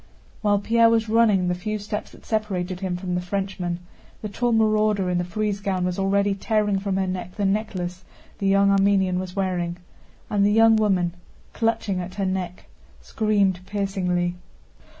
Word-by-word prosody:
While 205 -1 +3
Pierre 230 +3 +4
was 225 -1 +2
running 215 -5 +4
the 180 - +1
few 215 +4 -3
steps 210 0 -5
that - - -17
separated 190 -5 -2
him 185 -2 -2
from 180 0 -4
the 180 - 0
Frenchman, 180 -2 -3 0.4
the 215 - -3
tall 240 +4 0
marauder 215 -4 +2
in 175 - +1
the - - 0
frieze 205 +2 -2
gown 190 -2 -1
was 180 +1 -2
already 200 +1 +2
tearing 205 0 0
from 195 -1 -2
her 190 - +1
neck 185 -1 -5
the 205 - -1
necklace 190 -3 -2 0.4
the 195 - 0
young 200 0 +4
Armenian 195 -2 +3
was 185 0 -6
wearing, 180 -3 -1 0.5
and 205 -1 +1
the 205 - +4
young 225 +1 +6
woman, 190 -5 +2 0.4
clutching 225 -4 0
at 180 +1 -7
her 195 - -1
neck, 185 -1 -3 0.3
screamed 205 -4 +1
piercingly. 185 -3 -1
195 Hz, 170 wpm, -24 LUFS, 180-210 Hz, 0.5 s, young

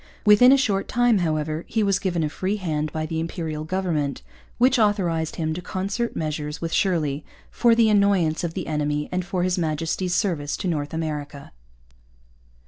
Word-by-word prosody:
Within 210 +5 +7
a 275 - +6
short 205 -7 0
time, 245 -3 +3
however, 155 -1 -1
he 220 - 0
was 200 -1 +2
given 175 -4 -1
a 150 - 0
free 190 +6 -2
hand 155 -6 -2
by 155 +1 -3
the 160 +1 -3
Imperial 160 -2 -4
government, 160 - -2 0.3
which 255 +1 +4
authorized 180 -7 +1
him 160 -1 -2
to 175 - -5
concert 200 +7 -3
measures 150 -1 -3
with 165 -1 -4
Shirley 155 -6 0 0.3
'for 235 -1 +3
the 230 -1 +4
annoyance 200 -7 +2
of 165 -1 -3
the - - -3
enemy, 150 -1 -1
and 180 0 -1
for 180 0 -2
his 185 0 0
Majesty's 165 +3 -1
Service 150 -7 -1
in 180 - 0
North 150 0 -3
America.' 150 -3 -5
170 Hz, 175 wpm, -23 LUFS, 155-195 Hz, 0.3 s, Within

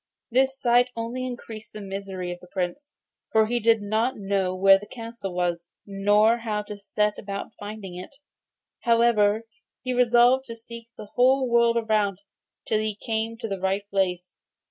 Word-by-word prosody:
This 265 +2 +2
sight 245 0 +4
only 235 +3 -3
increased 230 -3 -8
the 215 - -7
misery 195 -2 -5
of 175 - -7
the 180 - -15
Prince, 185 +11 -4 0.4
for 220 -1 +4
he 240 +2 0
did 225 -1 +3
not 220 +5 0
know 195 -2 -1
where 195 +1 +6
the 205 - -11
castle 230 -4 -7
was, 175 -1 -2 0.2
nor 205 +3 +3
how 215 -2 -2
to 210 0 -7
set 210 +1 -1
about 200 +2 -6
finding 205 -3 -7
it. 185 +10 -9 0.6
However, 230 -2 +3 0.4
he 255 0 -1
resolved 245 +2 +4
to 230 - -6
seek 230 0 -11
the 210 - -10
whole 260 +1 +4
world 235 -1 +3
through 210 -3 +2 0.5
till 215 - +1
he 215 -1 -2
came 225 +1 -3
to 225 -1 -5
the 195 -2 -4
right 195 +2 -1
place. 180 -2 -1
215 Hz, 165 wpm, -25 LUFS, 195-235 Hz, 0.6 s, where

